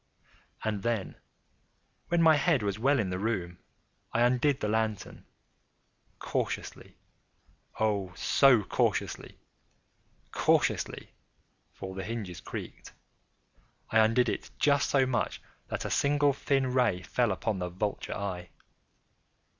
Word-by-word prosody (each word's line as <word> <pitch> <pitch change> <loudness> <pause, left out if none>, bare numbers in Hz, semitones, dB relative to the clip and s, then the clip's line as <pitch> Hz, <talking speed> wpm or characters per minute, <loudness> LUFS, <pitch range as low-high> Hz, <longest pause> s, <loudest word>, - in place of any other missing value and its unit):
And 105 -2 -1
then, 115 -4 -2 0.9
when 170 -1 +2
my 160 -1 +7
head 145 -4 +2
was 100 0 -2
well 140 +4 +3
in 100 -7 -1
the 90 - -2
room, 95 -5 -2 0.5
I 120 - +2
undid 125 +3 +2
the - - -1
lantern 110 -2 -2 0.9
cautiously—oh, 100 -4 -5
so 130 -6 +4
cautiously—cautiously - - -2 0.6
(for 95 0 -8
the 95 0 -5
hinges 100 -5 -5
creaked)—I 110 - -7
undid 115 +3 +4
it - - -3
just 140 -1 +3
so 135 -2 +3
much 130 -1 -1 0.3
that - - -4
a - - -3
single 145 0 +3
thin 135 -2 0
ray 125 -8 +2
fell 120 +7 +1
upon 95 +2 -2
the 90 0 -3
vulture 100 +4 -3
eye. 90 -3 -4
110 Hz, 110 wpm, -29 LUFS, 95-130 Hz, 0.9 s, my